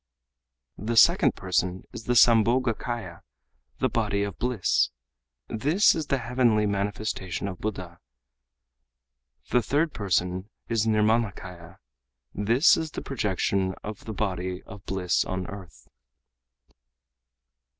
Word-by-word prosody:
The 115 +3 -2
second - - +5
person 90 0 -1
is 115 - -8
the 125 - +1
Sambhogakâya, 115 -4 +2 0.6
the - - +1
body 100 0 0
of 100 -3 -5
bliss. 125 -6 +1 0.6
This 150 - +3
is 155 -2 -3
the 140 - +1
heavenly 120 -3 +2
manifestation 100 -2 -2
of 90 -3 -6
Buddha. 90 -5 -5 1.5
The 125 - +4
third 150 +7 0
person 95 -1 -1 0.2
is 115 -2 0
the - - +1
Nirmânakâya. 105 -5 -1 0.6
This 115 - +4
is 160 -1 -3
the - - -7
projection 95 -5 -1
of 105 -1 -7
the 110 - -5
body 95 -2 -3
of 105 -3 -12
bliss 95 -2 0
on 95 0 -4
earth." 95 -2 -11
105 Hz, 115 wpm, -26 LUFS, 95-115 Hz, 1.5 s, second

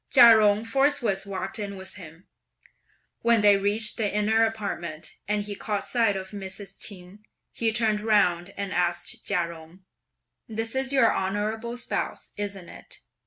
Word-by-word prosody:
Chia 235 -4 +9
Jung 210 +1 +3
forthwith 230 -6 +1
walked 195 +3 -4
in 200 -1 -5
with 190 0 -9
him. 170 -2 -13 1.0
When 230 -2 +4
they 205 -1 +6
reached 210 +2 0
the 210 -3 0
inner 215 +2 +2
apartment, 195 -8 -4
and 210 0 0
he 205 0 -5
caught 205 0 -3
sight 225 -5 +2
of 190 0 -5
Mrs. 195 -1 -7
Ch'in, 185 -1 -2 0.3
he 225 -1 0
turned 215 -1 +1
round 195 -4 +2
and 200 -1 -3
asked 175 +6 -1
Chia 180 -4 +1
Jung, 170 +3 -13 0.6
"This 225 +1 -3
is 265 0 0
your 265 -5 +4
honourable 215 +5 -2
spouse, - - -4
isn't 200 -3 -5
it?" - - -10
205 Hz, 155 wpm, -26 LUFS, 190-225 Hz, 1.0 s, Chia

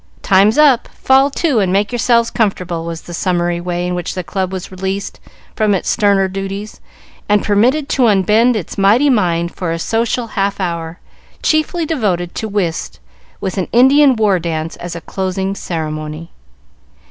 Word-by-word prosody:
"Time's 200 +5 +4
up; 285 -5 +4
fall 270 +1 +2
to 285 -3 0
and 190 -3 +1
make 200 +3 +1
yourselves 235 -1 +2
comfortable," 180 -7 -1
was 165 -1 -5
the 175 - -10
summary 175 -1 -1
way 175 0 -3
in 180 - -2
which 175 0 -4
the 185 - -3
club 190 +1 -3
was 190 -1 -6
released 190 +1 -4 0.4
from 215 -2 +2
its 185 - -1
sterner 200 -3 +2
duties 195 +2 -6 0.5
and 210 -1 +3
permitted 250 +8 +2
to 255 -3 +3
unbend 215 +4 +3
its 200 -1 -5
mighty 230 +9 +4
mind 170 -6 0
for 175 -3 -3
a 165 - -2
social 230 +6 -1
half 200 0 -1
hour, 170 -2 -4 0.4
chiefly 315 +2 +1
devoted 195 - -1
to 220 - -4
whist, 180 - -3 0.4
with 190 0 -3
an 185 - -2
Indian 265 +3 +5
war 210 -4 +2
dance 165 -1 -3
as 175 0 -7
a 170 - -6
closing 190 +1 -3
ceremony. 155 -2 -5
195 Hz, 165 wpm, -16 LUFS, 175-230 Hz, 0.5 s, Indian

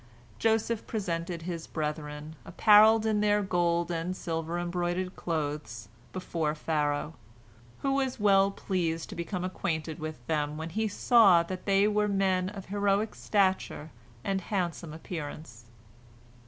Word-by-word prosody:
Joseph 225 0 +1
presented 170 -5 -3
his 170 -2 -5
brethren, 150 0 -4
apparelled 215 +1 +6
in 215 -1 +2
their 210 0 +3
gold 175 -2 +1
and 175 +2 -2
silver 165 0 -3
embroidered 175 +1 -2
clothes, 145 -9 -4 0.2
before 165 -4 -2
Pharaoh, 150 -1 -1 0.7
who 275 -1 +2
was 265 -3 -1
well 195 -1 +5
pleased 170 -5 -2
to - - -7
become 175 +2 -4
acquainted 160 -3 -3
with 155 -6 -6
them 150 0 -1
when 160 +1 -5
he 220 +5 0
saw 205 -5 +5
that 185 +3 -7
they 200 +1 +4
were 210 0 +2
men 190 -2 +1
of 200 -2 -8
heroic 205 +1 0
stature 190 -6 0 0.3
and 195 -1 -1
handsome 175 -4 -3
appearance. 150 -7 -7
175 Hz, 130 wpm, -29 LUFS, 160-200 Hz, 0.7 s, apparelled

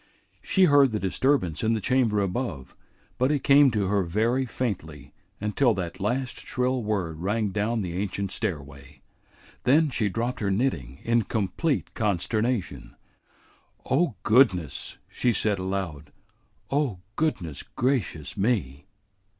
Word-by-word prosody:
She 190 - +2
heard 145 -6 +6
the 105 - 0
disturbance 95 - 0
in 115 +1 +2
the - - -1
chamber 115 -2 +2
above, 95 - -3 0.4
but 130 +2 +3
it 145 -3 0
came 140 0 +6
to 105 -4 0
her 100 +1 +2
very 115 +9 0
faintly 80 - -4 0.3
until 105 +3 +2
that 90 0 -5
last 125 +6 -2
shrill 125 0 -1
word 95 -8 -2
rang 105 +4 0
down 105 +3 0
the 90 -3 -4
ancient 100 0 -2
stairway. 70 - -5 0.6
Then 150 +4 +4
she 110 -5 0
dropped 120 +5 -2
her 100 - 0
knitting 95 - -1
in 115 0 +3
complete 115 - -1
consternation. 110 +2 -1 0.9
"Oh, 140 -1 +1
goodness!" 105 - +2
she 125 - 0
said 105 -3 0
aloud. 95 -6 -4 0.6
"Oh, 135 -10 0
goodness 90 - -2
gracious 120 - -2
me!" 95 - -1
105 Hz, 130 wpm, -26 LUFS, 90-125 Hz, 0.9 s, heard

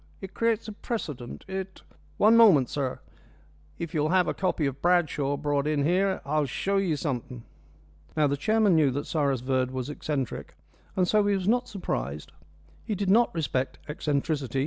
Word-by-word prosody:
It 190 -1 -9
creates 230 -1 0
a - - -5
precedent. 155 - -6
It 190 0 -6 0.2
" - - -31
"One 215 +2 +5
moment, 190 - +6
sir. 135 -3 -3 0.8
If 170 0 -5
you'll 155 -1 +1
have 180 0 +3
a - - 0
copy 180 -5 0
of 135 0 -3
Bradshaw 155 -5 +2
brought 145 0 0
in 150 -2 +1
here 190 +5 +1
I'll 150 0 +1
show 195 +10 -1
you 185 -5 +1
something." 125 -5 -4 0.7
Now, 155 - +4
the 140 0 +1
chairman 215 +5 +2
knew 155 -4 +4
that 140 +3 -3
Cyrus 140 -5 0
Verd 130 0 0
was 130 +2 -4
eccentric, 145 -4 -4 0.4
and 180 -1 +2
so 210 +1 +3
he 205 - +3
was 190 -1 -2
not 245 +3 +2
surprised. 75 - -4 0.5
He 215 - -2
did 195 -1 0
not 235 +3 +4
respect 135 -5 -1
eccentricity. 145 -3 -1
155 Hz, 175 wpm, -27 LUFS, 140-195 Hz, 0.8 s, moment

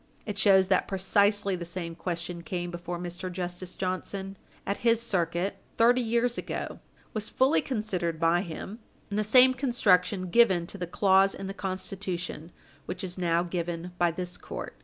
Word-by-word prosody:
It 205 -2 -4
shows 190 -2 +5
that 185 - +3
precisely 200 +1 +2
the 175 - -5
same 170 -1 -5
question 170 0 -4
came 175 +1 -4
before 175 0 -5
Mr. 175 +1 -5
Justice 180 0 -5
Johnson, 190 +1 -3 0.3
at 200 - -1
his 230 -1 +3
circuit, 185 -3 -1 0.2
thirty 245 +2 +5
years 235 +1 +1
ago - - -5 0.3
was 215 -1 -2
fully 265 +4 +3
considered 185 - -2
by 165 +1 +3
him, 190 +5 -7 0.3
and 205 - 0
the - - +2
same 255 +4 +7
construction 200 -8 +2
given 190 -7 +5
to 200 +3 -9
the 175 - -3
clause 195 +2 +4
in 195 - -6
the 195 - -4
Constitution 185 -3 -4 0.4
which - - -4
is 185 0 -5
now 170 -1 +2
given 175 0 -4
by 175 -1 +4
this 180 +1 -5
court. - - -7
185 Hz, 165 wpm, -28 LUFS, 175-205 Hz, 0.4 s, same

